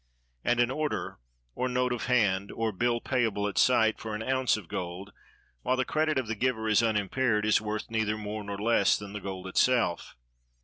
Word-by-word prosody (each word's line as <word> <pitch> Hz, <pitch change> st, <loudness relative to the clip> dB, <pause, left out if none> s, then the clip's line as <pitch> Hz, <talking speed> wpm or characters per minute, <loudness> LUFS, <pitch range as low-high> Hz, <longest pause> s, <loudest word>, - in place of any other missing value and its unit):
And 120 Hz, 0 st, +1 dB
an 120 Hz, +1 st, +3 dB
order, 150 Hz, +2 st, -3 dB, 0.3 s
or 125 Hz, 0 st, -2 dB
note 125 Hz, 0 st, 0 dB
of 120 Hz, -, -4 dB
hand, 100 Hz, -6 st, +1 dB
or 115 Hz, -1 st, -1 dB
bill 120 Hz, +4 st, 0 dB
payable 115 Hz, -6 st, 0 dB
at 100 Hz, -, -1 dB
sight, 110 Hz, -4 st, +4 dB
for 110 Hz, -1 st, -5 dB
an 110 Hz, -, -4 dB
ounce 130 Hz, -1 st, +1 dB
of 100 Hz, -6 st, -10 dB
gold, 90 Hz, +3 st, -6 dB, 0.5 s
while 130 Hz, -, 0 dB
the 130 Hz, -, +1 dB
credit 155 Hz, -1 st, 0 dB
of 130 Hz, -, 0 dB
the 115 Hz, -, -3 dB
giver 110 Hz, 0 st, -1 dB
is 110 Hz, 0 st, +4 dB
unimpaired, 110 Hz, +1 st, +1 dB
is 110 Hz, -1 st, +3 dB
worth 110 Hz, +1 st, -4 dB
neither 110 Hz, -1 st, 0 dB
more 105 Hz, 0 st, -5 dB
nor 100 Hz, 0 st, -5 dB
less 110 Hz, -2 st, +3 dB
than 100 Hz, -1 st, -9 dB
the 105 Hz, -, -5 dB
gold 95 Hz, -1 st, -6 dB
itself. 110 Hz, 0 st, +1 dB
110 Hz, 195 wpm, -28 LUFS, 105-125 Hz, 0.5 s, sight